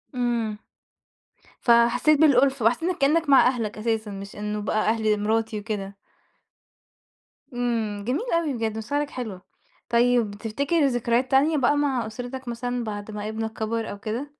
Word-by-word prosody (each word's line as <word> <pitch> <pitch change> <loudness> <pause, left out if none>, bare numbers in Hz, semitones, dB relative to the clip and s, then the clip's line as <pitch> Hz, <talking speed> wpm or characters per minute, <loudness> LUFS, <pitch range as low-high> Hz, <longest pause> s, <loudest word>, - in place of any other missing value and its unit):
إمم. 235 -3 -1 1.0
فحسّيت 240 +5 +4
بالأُلْفة 275 -5 +4
وحسّيت 325 +10 +1
كإنّك 300 +2 +2
مع 270 - +7
أهلك 230 -5 -2
أساسًا 220 -1 -2
مش 195 0 -8
إنه 210 0 -3
بقى 215 +1 0
أهل 220 -2 +1
مراتي 220 0 0
وكده. 200 -2 -5 1.6
إمم، 225 -4 -2
جميل 325 - -1
أوي 335 -4 +1
بجد، 225 -2 -2
مشاعرك 290 +7 -2
حلوة. 215 -8 -6 0.5
طيب 240 -2 +3
تفتكِر 280 +9 0
ذكريات 245 +1 0
تانية 295 +4 +4
بقى 275 +2 +3
مع 265 -6 0
أسرتك 245 +3 -7
مثلًا 245 +1 -3
بعد 210 -1 -6
ما 210 0 -5
ابنك 220 0 -4
كبر 225 +1 -3
أو 200 - -8
كده؟ 230 +7 -4
235 Hz, 140 wpm, -24 LUFS, 215-265 Hz, 1.6 s, مع